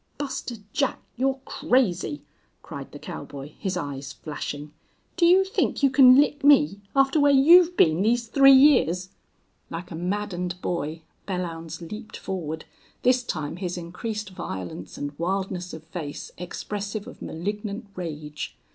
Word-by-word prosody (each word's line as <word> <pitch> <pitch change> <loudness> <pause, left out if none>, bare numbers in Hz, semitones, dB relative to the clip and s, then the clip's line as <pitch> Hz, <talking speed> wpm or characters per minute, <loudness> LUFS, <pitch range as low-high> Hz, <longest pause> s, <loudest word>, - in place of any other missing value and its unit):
"Buster 265 -3 -4 0.2
Jack 275 -2 0 0.2
you're 265 +2 0
crazy!" 180 - 0 0.4
cried - - -8
the - - -9
cowboy, 140 +1 -8
his 190 -2 -2
eyes 140 -4 -5
flashing. 145 0 -6 0.4
"Do 340 - +4
you 370 +2 +6
think 385 -5 -1
you 275 - +5
can 260 -1 +8
lick 290 0 +2
me 205 - +5
after 270 +2 +4
where 285 0 +5
you've 340 +6 +7
been 160 +1 +4
these 235 +3 +2
three 275 +3 +7
years?" 255 - +5 0.6
Like 175 +2 -7
a - - -5
maddened 180 0 -3
boy 160 -2 -3 0.2
Belllounds 165 -3 -4
leaped 215 +1 -7
forward, 160 -4 -5 0.4
this 255 0 +4
time 155 -8 -4
his 180 -1 -3
increased 200 +4 -5
violence 95 - -6
and 145 0 -4
wildness 185 0 -2
of 160 -1 -9
face 160 -3 -7
expressive 205 +4 -5
of - - -12
malignant 205 +5 -4
rage. 150 -4 -6
185 Hz, 140 wpm, -25 LUFS, 165-255 Hz, 0.6 s, can